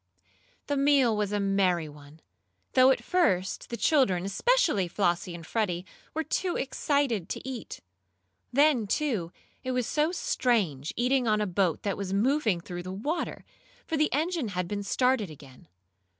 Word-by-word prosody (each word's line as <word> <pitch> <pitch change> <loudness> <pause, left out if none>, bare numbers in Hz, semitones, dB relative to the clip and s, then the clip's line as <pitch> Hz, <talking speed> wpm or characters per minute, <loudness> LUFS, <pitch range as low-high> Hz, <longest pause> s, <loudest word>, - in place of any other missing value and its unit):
The 285 - -1
meal 275 -5 +4
was 210 -1 -1
a 205 - 0
merry 190 -4 +1
one, 145 +1 -14 0.5
though 255 0 +6
at 265 - +2
first 245 - 0
the 235 - -4
children, 215 - +2
especially 210 - +2
Flossie 175 -1 -1
and 165 -1 -9
Freddie, 180 -3 -1 0.3
were 320 - 0
too 355 +2 -1
excited 270 - 0
to - - -5
eat. 255 -4 -6 0.7
Then, 275 -4 +3
too, 210 - -1 0.3
it 255 0 -2
was 250 -1 0
so 305 +6 +1
strange 200 - 0
eating 250 0 +1
on 215 -1 +3
a 210 - +1
boat 185 -3 0
that 200 -2 -1
was 195 -1 -4
moving 220 - +2
through 175 +1 -7
the 185 +1 -7
water, 280 - -3 0.4
for 320 - -2
the 305 0 +2
engine 320 -2 0
had 180 -3 -3
been 205 +2 -3
started 250 0 +1
again. 140 -4 -14
215 Hz, 160 wpm, -28 LUFS, 180-275 Hz, 0.7 s, though